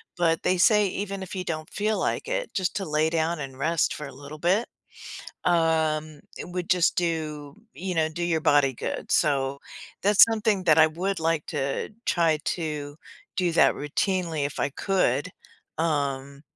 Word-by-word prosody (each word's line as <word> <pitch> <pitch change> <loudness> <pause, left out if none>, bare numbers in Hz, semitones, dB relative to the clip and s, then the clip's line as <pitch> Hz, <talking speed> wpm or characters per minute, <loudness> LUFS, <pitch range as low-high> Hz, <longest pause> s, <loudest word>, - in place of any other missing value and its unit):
But 165 -2 +1
they 185 - +2
say 210 +2 +5
even 195 0 -4
if 190 - -8
you 185 - -3
don't 155 0 -4
feel 215 +1 -1
like - - -1
it, - - -3
just 190 -2 -1
to 195 - -3
lay 155 +1 +1
down 165 0 0
and 135 -2 -7
rest 165 +3 +1
for 150 - -6
a 135 - -11
little 145 +3 -10
bit, 190 +8 +2 0.8
um, 160 -3 +1 0.2
it - - -6
would 180 +1 -4
just 180 -2 +3
do 155 -4 -2 0.2
you 185 0 -4
know, 160 -1 +2
do 165 +2 -6
your 165 -2 +1
body 145 -3 +4
good, 120 - -5
so 140 -1 +1 0.4
that's 205 +1 +8
something 215 -4 0
that 160 -2 +5
I 160 - +8
would 180 +3 -3
like 160 -1 0
to 140 +2 -2 0.2
try 165 -3 +2
to 150 -3 -3 0.4
do 180 -2 +1
that - - +4
routinely 165 0 -1
if 145 - -8
I - - +1
could, 180 -2 0 0.5
um, 140 -3 -1
165 Hz, 175 wpm, -26 LUFS, 150-185 Hz, 0.8 s, that's